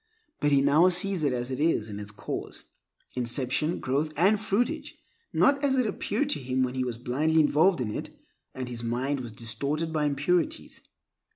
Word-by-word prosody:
But 145 - +2
he 140 -1 +4
now 150 +6 +5
sees 185 -1 0
it 145 - +2
as 125 +1 -3
it 130 - -3
is 150 -8 +2
in 105 -1 -6
its 105 0 -7
cause, 105 - -6 0.5
inception, 130 +6 0
growth, 145 +4 -1
and 200 +6 +4
fruitage, 220 +2 -1 0.3
not 280 0 +3
as 270 -2 +2
it 255 - +3
appeared 220 +6 -1
to - - 0
him 130 0 0
when 125 -1 -1
he 130 -1 -1
was 125 -2 -3
blindly 150 +7 +1
involved 155 +3 +4
in 115 -4 -2
it, - - -5 0.5
and 130 -1 -4
his 120 -1 -4
mind 130 +4 -1
was 120 -3 -6
distorted 140 +9 -3
by 150 -1 +1
impurities. 150 +4 0
145 Hz, 185 wpm, -27 LUFS, 125-175 Hz, 0.5 s, now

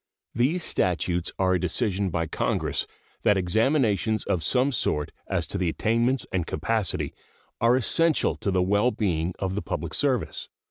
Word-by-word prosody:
These 145 +10 +1
statutes 90 -1 0
are 95 -1 +2
a 90 - +2
decision 100 +1 0
by 80 -1 -1
Congress - - -1 0.3
that 105 - +3
examinations 110 - +1
of 90 - -1
some 130 +2 +2
sort 75 - -1 0.2
as 90 -4 -1
to 95 -2 -3
attainments 115 +9 +1
and 90 -4 -1
capacity 110 -6 -1 0.5
are 115 +2 +4
essential 160 +5 +2
to - - -2
the 95 -1 +2
well 105 +6 +3
being 90 -7 -1
of 95 -1 -2
the 105 - -2
public - - -4
service. - - 0
100 Hz, 150 wpm, -26 LUFS, 90-120 Hz, 0.5 s, are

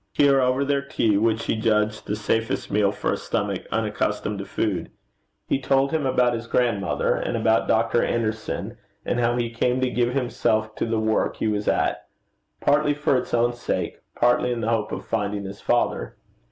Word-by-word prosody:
Here, 140 -2 +4
over 130 +2 +2
their 140 0 +1
tea, 115 -6 +1
which 110 +1 +1
he - - 0
judged 110 -1 0
the 105 - -1
safest 115 +1 -1
meal 100 -1 +3
for 105 - -1
a - - -2
stomach - - -3
unaccustomed - - -1
to - - -5
food, - - -2 0.6
he - - +1
told 135 +1 +2
him 155 -4 0
about 125 -2 +3
his 115 0 -4
grandmother, 115 -6 +1
and 120 - -2
about 110 0 +2
Dr. 115 +1 +2
Anderson, 110 -2 -2 0.3
and 120 - 0
how 120 0 +2
he 120 -1 -1
came 125 +2 0
to 130 -1 +1
give 120 +1 0
himself 110 -4 0
to - - -1
the 110 -1 0
work 110 0 +1
he - - -1
was 105 -1 -1
at, - - 0 0.5
partly 145 0 +3
for 145 -2 +1
its 125 0 -1
own 120 0 +2
sake, 120 - -3 0.2
partly 120 +1 +2
in 120 -1 -2
the 110 - -1
hope 110 -2 0
of - - -5
finding 105 -2 -2
his 100 +1 -8
father. 120 - 0
115 Hz, 190 wpm, -24 LUFS, 110-125 Hz, 0.6 s, Here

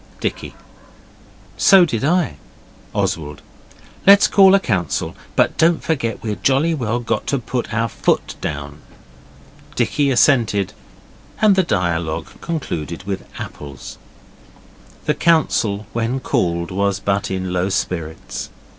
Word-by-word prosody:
Dicky - - -4 1.0
'So 195 -3 +7
did 120 -7 -3
I.' 160 - +1 0.5
Oswald 75 -3 -2 0.6
'Let's 200 0 +8
call 195 -1 +6
a - - +4
council. 95 - -2 0.2
But - - +2
don't 165 0 +3
forget 115 -10 -2
we've 105 -4 -4
jolly 140 +8 +2
well 120 -5 -1
got 120 - -2
to 140 - +1
put 125 0 -4
our 115 +1 0
foot - - 0
down.' 75 +1 -5 1.0
Dicky 145 -1 +1
assented, 120 -7 +3 0.7
and 210 -2 +5
the 190 - +4
dialogue 85 - -1
concluded 85 - -4
with 95 -1 -5
apples. 70 -3 -9 1.1
The - - +2
council, 110 -11 +1
when 115 +3 -1
called, 85 -7 -1
was 100 +1 0
in - - -15
but 100 0 0
low 95 -1 -1
spirits. 80 -10 -4
105 Hz, 120 wpm, -19 LUFS, 90-145 Hz, 1.1 s, Let's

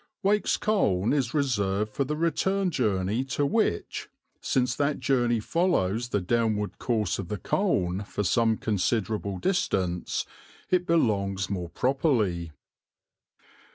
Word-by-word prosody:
Wake's 205 +2 +2
Colne 110 - +1
is 130 -4 0
reserved 105 -7 0
for 140 - 0
the 150 +3 -3
return 180 +4 +1
journey 105 - 0
to 140 +2 -1
which, 175 - -1 0.3
since 125 -1 +1
that 145 0 0
journey 120 -3 +2
follows 120 - 0
the 105 - +1
downward 105 +1 0
course 110 -6 0
of 95 - -4
the 105 - -3
Colne 95 - 0
for 105 +1 -3
some 110 +3 +2
considerable 105 -1 -1
distance, 90 - -1 0.5
it 180 -1 +2
belongs 100 - +1
more 90 -3 -3
properly. 110 - 0
115 Hz, 120 wpm, -27 LUFS, 100-145 Hz, 0.5 s, Wake's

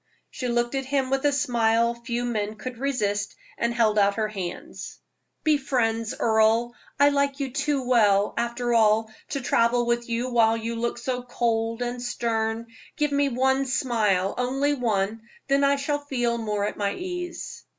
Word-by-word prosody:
She 255 - -4
looked 240 +1 0
at 270 -1 -2
him 270 -1 0
with 270 +1 0
a - - +3
smile 235 -4 +2
few 235 +1 -3
men 215 -3 -2
could 240 +3 -7
resist, 210 -7 -1 0.2
and 235 - 0
held 220 -3 +2
out 200 0 +3
her 215 0 -1
hands. 190 -4 -6 0.5
"Be 310 -2 +4
friends, 230 -4 0
Earle; 225 +1 +3 0.3
I 285 0 +7
like 280 0 0
you 270 -2 -2
too 275 -1 -1
well, 205 -5 +4
after 235 0 -1
all, 220 -1 +3 0.2
to 275 - -3
travel 240 0 +2
with 235 0 -1
you 235 +2 -1
while 225 -1 +4
you 230 +1 -4
look 235 +1 -2
so 250 +1 -3
cold 230 -1 -1
and 245 0 -4
stern. 230 -2 -1 0.3
Give 295 -1 0
me 280 0 +2
one 265 +2 +1
smile 215 -7 +1
only 270 +4 +1
one 220 -4 -1 0.3
then 275 0 +3
I 280 0 +4
shall 290 +1 -1
feel 245 -5 -1
more 210 -2 -1
at - - -4
my 200 -1 -1
ease." 355 -1 -6
240 Hz, 170 wpm, -25 LUFS, 225-265 Hz, 0.5 s, I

